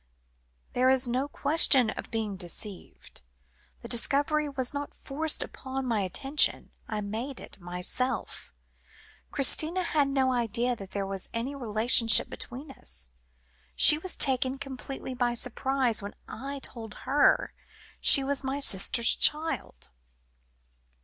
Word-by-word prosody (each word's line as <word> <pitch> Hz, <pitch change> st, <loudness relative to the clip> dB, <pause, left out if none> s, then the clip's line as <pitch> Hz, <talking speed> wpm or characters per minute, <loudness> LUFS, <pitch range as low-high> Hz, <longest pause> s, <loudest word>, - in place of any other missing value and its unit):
"There 255 Hz, +1 st, +2 dB
is 260 Hz, -1 st, +2 dB
no 255 Hz, +4 st, -2 dB
question 280 Hz, -5 st, +4 dB
of -, -, -8 dB
being 220 Hz, -3 st, -3 dB
deceived. 185 Hz, -, -6 dB, 0.6 s
The -, -, -7 dB
discovery 290 Hz, +5 st, +1 dB
was 260 Hz, -2 st, -3 dB
not 285 Hz, 0 st, -6 dB
forced 310 Hz, +3 st, 0 dB
upon 265 Hz, 0 st, -7 dB
my 230 Hz, -4 st, -1 dB
attention; 270 Hz, +10 st, +1 dB, 0.2 s
I 215 Hz, -2 st, -4 dB
made 225 Hz, +6 st, -5 dB
it -, -, -11 dB
for 185 Hz, -, -22 dB
myself. 180 Hz, +9 st, -3 dB, 0.8 s
Christina 315 Hz, +6 st, +3 dB
had 300 Hz, -4 st, 0 dB
no 265 Hz, -2 st, 0 dB
idea 240 Hz, +1 st, -1 dB
that 195 Hz, -4 st, -11 dB
there 200 Hz, 0 st, -4 dB
was 195 Hz, -1 st, -4 dB
any 240 Hz, +5 st, -3 dB
relationship 230 Hz, -2 st, +3 dB
between 270 Hz, +4 st, -7 dB
us. 65 Hz, -, -5 dB, 0.7 s
She 300 Hz, -, +8 dB
was 370 Hz, +2 st, -1 dB
taken 265 Hz, 0 st, +2 dB
completely 270 Hz, -1 st, -7 dB
by 245 Hz, -1 st, -1 dB
surprise, 250 Hz, -1 st, 0 dB
when 200 Hz, +1 st, -9 dB
I 275 Hz, +2 st, -7 dB
told 225 Hz, -3 st, -6 dB
her 280 Hz, +3 st, +2 dB, 0.5 s
she 275 Hz, -, +5 dB
was 275 Hz, 0 st, -2 dB
my 270 Hz, +1 st, -3 dB
sister's 235 Hz, -1 st, +3 dB
child." 305 Hz, -, 0 dB
255 Hz, 130 wpm, -27 LUFS, 225-275 Hz, 0.8 s, She